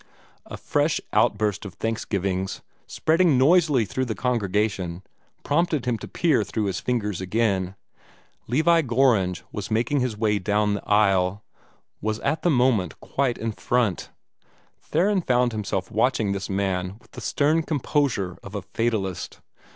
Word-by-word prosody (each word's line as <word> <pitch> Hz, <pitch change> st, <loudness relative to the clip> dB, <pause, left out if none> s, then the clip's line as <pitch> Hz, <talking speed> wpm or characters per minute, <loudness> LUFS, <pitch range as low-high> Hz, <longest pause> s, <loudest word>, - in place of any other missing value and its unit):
A -, -, -7 dB
fresh -, -, 0 dB
outburst 105 Hz, -1 st, +1 dB
of 95 Hz, -5 st, -8 dB
thanksgivings, 100 Hz, -4 st, -2 dB, 0.3 s
spreading 160 Hz, -3 st, +2 dB
noisily 145 Hz, -3 st, +4 dB
through 130 Hz, +6 st, -2 dB
the 110 Hz, -3 st, -3 dB
congregation, 100 Hz, -6 st, -1 dB, 0.4 s
prompted 155 Hz, -2 st, +1 dB
him 120 Hz, -3 st, 0 dB
to -, -, -8 dB
peer 155 Hz, -10 st, +2 dB
through 105 Hz, +2 st, -3 dB
his 100 Hz, -2 st, -1 dB
fingers 105 Hz, -7 st, -2 dB
again. 95 Hz, -2 st, 0 dB, 0.7 s
Levi 160 Hz, +7 st, +3 dB
Gorringe 115 Hz, -, +2 dB
was 105 Hz, -, -5 dB
making 120 Hz, +6 st, +1 dB
his 125 Hz, -4 st, -1 dB
way 105 Hz, -1 st, +1 dB
down 105 Hz, +2 st, +1 dB
the 100 Hz, -, -5 dB
aisle 100 Hz, -2 st, +3 dB, 0.6 s
was 110 Hz, +1 st, -2 dB
at 155 Hz, 0 st, 0 dB
the 175 Hz, -, +2 dB
moment 125 Hz, -, +2 dB
quite 135 Hz, -3 st, -1 dB
in 115 Hz, 0 st, -2 dB
front. 115 Hz, -3 st, -1 dB, 0.7 s
Theron 190 Hz, +5 st, +1 dB
found 125 Hz, -4 st, +2 dB
himself 105 Hz, -4 st, -3 dB
watching 110 Hz, -2 st, +1 dB
this 100 Hz, -2 st, -3 dB
man 95 Hz, -1 st, -1 dB
with -, -, -25 dB
the -, -, -9 dB
stern 155 Hz, +3 st, +2 dB
composure 140 Hz, -, -1 dB
of 100 Hz, +1 st, -10 dB
a 100 Hz, -, -4 dB
fatalist. 110 Hz, -6 st, -2 dB
110 Hz, 145 wpm, -24 LUFS, 100-130 Hz, 0.7 s, noisily